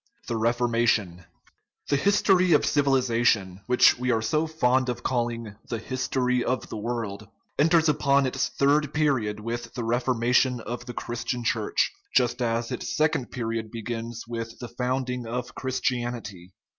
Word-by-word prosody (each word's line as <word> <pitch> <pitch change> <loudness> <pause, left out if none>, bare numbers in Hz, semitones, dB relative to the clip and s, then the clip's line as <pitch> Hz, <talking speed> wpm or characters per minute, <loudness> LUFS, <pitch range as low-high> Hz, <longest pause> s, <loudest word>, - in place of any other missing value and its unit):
THE 120 - -2
REFORMATION 115 -6 +1 0.6
The 145 - +3
history 185 +1 +3
of 150 - +4
civilization, 120 -9 +2
which 125 -1 +5
we 125 0 -1
are 115 -2 +2
so 155 +7 +1
fond 130 -4 +1
of 120 - -4
calling 115 -3 -2 0.2
"the 115 - -2
history 125 +1 -1
of 130 +1 -2
the - - -5
world," 110 -2 -4 0.3
enters 160 +2 +4
upon 140 -2 +3
its 130 +1 -1
third 145 +1 +1
period 130 -9 +1
with 115 +1 -5
the 120 - -3
Reformation 125 +1 +2
of 120 +2 -6
the 120 - -7
Christian 120 +1 -3
Church, 110 -2 +1 0.2
just 125 0 +2
as 115 0 -1
its - - -4
second 155 -5 +1
period 115 -2 -3
begins 115 0 -5
with 115 -1 -5
the 120 - -7
founding 125 0 -2
of 120 0 -4
Christianity. 120 -8 -3
120 Hz, 145 wpm, -26 LUFS, 115-130 Hz, 0.6 s, which